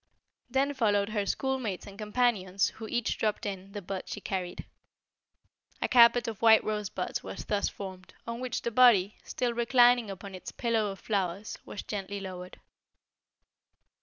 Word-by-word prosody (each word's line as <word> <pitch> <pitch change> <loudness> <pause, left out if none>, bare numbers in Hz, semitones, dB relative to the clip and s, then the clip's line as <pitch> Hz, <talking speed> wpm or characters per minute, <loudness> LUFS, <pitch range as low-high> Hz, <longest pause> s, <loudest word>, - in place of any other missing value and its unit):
Then 270 +3 +1
followed 205 -6 +2
her 205 -2 -1
schoolmates 260 -8 -2
and 200 - -11
companions 210 -3 +1
who 220 0 -9
each 240 -1 -1
dropped 215 0 -1
in 195 -1 -5
the 205 -2 -6
bud 190 +1 -5
she - - -4
carried. 185 -3 -4 1.1
A - - 0
carpet 240 -1 +6
of 225 -3 -5
white 225 -1 +7
rosebuds 210 -3 -3
was - - -7
thus 205 -1 0
formed, 185 -2 -9
on 235 0 -5
which 255 -1 -3
the 235 - -1
body, 220 -5 +5
still 245 -2 -2
reclining 240 -1 +4
upon 195 0 -8
its 185 - -8
pillow 230 -3 0
of 195 - -7
flowers, 195 -1 -2
was - - -7
gently 200 -1 -4
lowered. 185 -2 -8
210 Hz, 155 wpm, -29 LUFS, 195-235 Hz, 1.1 s, white